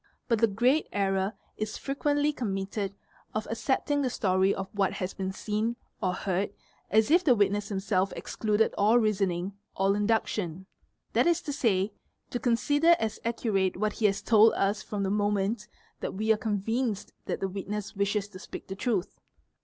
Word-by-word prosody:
But 230 -3 +2
the 230 - +5
great 245 +9 +2
error 195 0 0 0.2
is 215 0 -3
frequently 290 +2 0
com 225 -8 -2
mitted 195 0 -3 0.4
of 215 - -2
accepting 275 +4 0
the 260 - +1
story 190 -3 +2
of 195 -1 -3
what 200 -1 +1
has 185 -2 -3
been 190 -1 -3
seen 215 +4 -1 0.3
or 185 - +1
heard 190 +1 -1 0.4
as 220 +5 +3
if 345 +2 +6
the 255 -7 +5
witness 205 0 +1
himself 195 -1 0
excluded 215 0 0
all 215 +4 +5
reasoning, 195 -4 +1 0.2
all 195 +1 +2
induction: 205 -4 0 0.5
that - - +4
is 345 -1 +3
to 290 - -3
say, 200 -6 +1 0.4
to" 245 - -1
consider 290 +8 +4
as 220 -1 -2
accurate 215 -6 0
what 215 +1 0
he 215 - +2
has 195 -1 -1
told 220 0 +6
us 200 +2 +1
from 205 -2 -3
the 195 - 0
moment 205 +1 0 0.3
that - - -4
we 220 +2 +3
are - - -1
convinced 220 +1 -1
that - - -2
the 195 - -1
witness 200 +2 -5
wishes 200 0 0
to 185 -3 -11
speak - - -9
the 190 - -4
truth. 205 -3 -2
210 Hz, 175 wpm, -28 LUFS, 195-230 Hz, 0.5 s, if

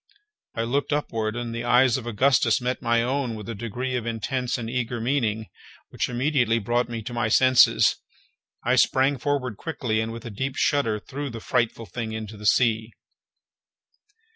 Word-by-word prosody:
I 115 - -1
looked 140 +6 -1
upward, 115 -7 -1
and 120 -1 -4
the 120 +1 -4
eyes 125 0 +4
of 125 -3 -4
Augustus 120 0 +3
met 125 +1 -2
my 115 0 +2
own 130 -2 -1
with 105 -2 -8
a 115 - -4
degree 120 +4 -4
of 120 -2 -3
intense 125 +3 -2
and 115 -2 -5
eager 120 0 -2
meaning 115 -3 0 0.4
which - - -2
immediately 125 -2 +1
brought 120 +3 0
me 115 -1 -5
to 120 - -6
my 120 -1 0
senses. 130 +2 +5 0.7
I 125 +2 +3
sprang 135 +2 +3
forward 130 -5 -1
quickly, 125 -9 -2
and, 110 0 -3
with 115 +1 -8
a 120 - -6
deep 130 +6 -3
shudder, 125 -7 +1
threw 140 +6 -6
the 115 -2 -7
frightful 115 0 -1
thing 110 0 -5
into 110 -1 -6
the 105 0 -4
sea. 110 -1 +2
120 Hz, 175 wpm, -25 LUFS, 115-130 Hz, 0.7 s, senses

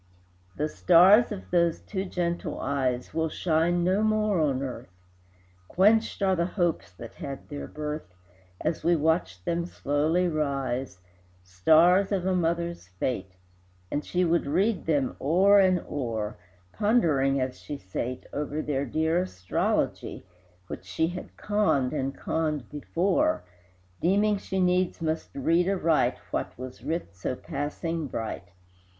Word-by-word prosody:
The 150 - 0
stars 185 +9 +6
of 200 -2 -7
those 170 -2 +2
two 195 -2 -4
gentle 175 -2 -2
eyes 130 -3 -1
Will 160 0 0
shine 170 +2 +1
no 185 +4 +2
more 215 -3 +2
on 140 -3 +1
earth; 130 -8 -6 0.8
Quenched 215 - +3
are 190 -1 +3
the 170 0 0
hopes 175 -4 -1
that 115 +5 -10
had 140 -5 -7
their 145 -1 -6
birth, 150 - -5 0.5
As 165 - -2
we 175 0 +4
watched 150 - 0
them 170 0 -1
slowly 160 +3 +1
rise, 135 - -2 0.5
Stars 160 - +4
of 190 -3 0
a 190 - +2
mother's 170 - -1
fate; 95 +1 -3 0.6
And 145 - -1
she 180 0 0
would 170 -3 +1
read 190 +8 +1
them 145 -5 +1
o'er 190 +8 +5
and 185 -2 +4
o'er, 115 -6 -3 0.4
Pondering 155 - +2
as 130 0 -3
she 145 - -6
sate, 125 +5 -5
Over 150 +1 -2
their 140 -1 -1
dear 160 +2 +1
astrology, 90 - -2 0.4
Which 90 - -8
she 160 - 0
had 180 0 -8
conned 205 -12 +1
and 135 -2 -2
conned 155 -6 -2
before, 195 - 0 0.6
Deeming 205 +4 +3
she 190 -1 -3
needs 180 0 +2
must 160 -1 -2
read 165 +6 +2
aright 170 -5 +2
What - - -3
was 130 0 -9
writ 165 - -3
so 95 +8 -3
passing 150 +4 -4
bright. 110 -6 -5
160 Hz, 140 wpm, -27 LUFS, 135-180 Hz, 0.8 s, stars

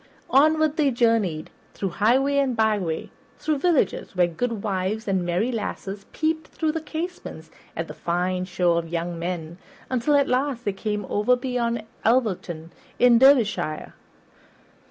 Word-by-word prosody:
Onward 310 +2 +4
they 295 -3 +3
journeyed, 225 -10 +1 0.2
through 195 - -2
highway 255 +10 +2
and 265 -3 +1
byway, 205 -7 0 0.3
through 305 -2 -1
villages 300 - +1
where 180 -1 +4
goodwives 210 +1 -2
and 190 -2 +1
merry 180 +8 0
lasses 205 -3 -5
peeped 315 0 -1
through 315 -1 -1
the 320 +1 -3
casements 335 +3 -6 0.3
at - - -2
the - - -8
fine 180 +1 -1
show 180 -1 +1
of 165 -1 -7
young 170 0 -3
men, 170 0 -4 0.3
until 255 +4 +2
at 280 -1 +4
last 255 -1 0
they 205 - 0
came 210 0 -3
over 210 +5 +2
beyond 245 -3 -2 0.2
Alverton 185 -9 0 0.3
in 245 -1 +6
Derbyshire. 225 - +3
220 Hz, 140 wpm, -24 LUFS, 185-265 Hz, 0.3 s, in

